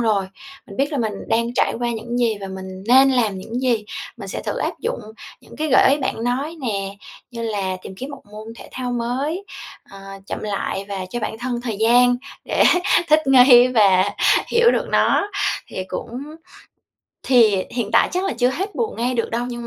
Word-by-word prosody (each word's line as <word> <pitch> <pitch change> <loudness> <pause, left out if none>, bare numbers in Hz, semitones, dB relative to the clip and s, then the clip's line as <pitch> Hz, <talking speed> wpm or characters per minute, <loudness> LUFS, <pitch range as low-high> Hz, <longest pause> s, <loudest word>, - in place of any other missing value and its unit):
rồi. 210 -4 +1 0.4
Mình 200 - -11
biết 280 +3 0
là 285 - -1
mình 220 -3 -1 0.2
đang 235 +2 0
trải - - +1
qua 240 0 -1
những 235 +1 -4
gì 230 -3 +2
và 195 - -5
mình 190 0 -8
nên 265 +2 +6
làm 225 -7 +1
những 225 +5 -9
gì, 235 -4 +1 0.3
mình 200 -4 -9
sẽ - - -5
thử - - -3
áp - - -3
dụng 475 +2 -3 0.4
những - - -15
cái 310 0 -2
gợi 260 - +5
ý 285 - +2
bạn 235 -4 -3
nói 275 +7 -2
nè, 200 -5 -3 0.3
như 230 -1 -6
là 200 -4 -2
tìm 190 - -9
kiếm 265 +6 -7
một 280 - -10
môn 220 +2 -9
thể - - -11
thao 250 -1 -4
mới, 265 +10 -2 0.5
ờ, 195 - -12 0.3
chậm - - -5
lại 200 -1 -3
và 190 -2 -4
cho 240 - -4
bản 220 +1 -4
thân 245 0 -3
thời 230 -4 -4
gian 245 +2 +4 0.3
để - - +2 0.4
thích 310 +1 +5
nghi 250 -2 +7
và 200 -5 +4 0.4
hiểu 470 0 +4
được - - -1
nó. 405 - +2 0.4
Thì 185 - -6
cũng 245 +7 -6 1.0
thì 220 -7 +4
hiện 235 -4 -3
tại - - +4
chắc 365 +2 -1
là - - -1
chưa 245 0 +3
hết 385 +9 -4
buồn 455 -2 -2
ngay 245 +2 -1
được 230 - -1
đâu 235 +1 -1
nhưng 240 -1 -6
240 Hz, 205 wpm, -21 LUFS, 210-260 Hz, 1.0 s, nghi